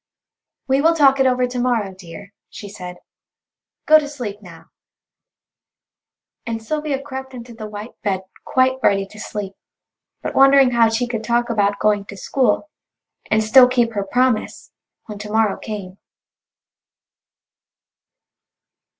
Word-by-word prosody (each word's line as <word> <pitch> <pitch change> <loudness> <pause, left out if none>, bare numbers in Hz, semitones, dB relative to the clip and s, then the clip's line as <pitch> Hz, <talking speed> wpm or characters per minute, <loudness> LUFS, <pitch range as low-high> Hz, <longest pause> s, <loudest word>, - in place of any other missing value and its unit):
"We 270 +1 +2
will 330 +2 +3
talk 275 -3 +4
it 265 - +4
over 250 0 +2
to 250 0 -4
morrow, 235 -6 0
dear," 185 +1 -12 0.2
she 205 - -10
said; 180 -3 -9 0.9
"go 310 0 +7
to 295 - -5
sleep 225 -8 -7
now," 170 -4 -15 1.7
and 230 -1 -4
Sylvia 300 +2 -2
crept 265 -1 -8
into 240 -1 -10
the 220 -1 -8
white 210 +2 -8
bed 195 -3 -1 0.2
quite 260 0 +1
ready 195 -4 +2
to 210 +2 -15
sleep, 205 -2 -6 0.7
but - - -4
wondering 270 -1 +6
how 230 -2 +4
she 225 +2 -1
could 230 -2 -4
talk 240 +1 0
about 205 -2 +1
going 205 -1 +1
to 200 - -10
school, 265 +8 0 0.6
and 220 0 +2
still 250 +4 +7
keep 240 -2 +1
her 200 -2 -2
promise, 245 +2 -1 0.3
when 210 -2 -9
to 210 0 -7
morrow 220 -2 +2
came. 200 -3 -8
230 Hz, 140 wpm, -20 LUFS, 205-260 Hz, 1.7 s, go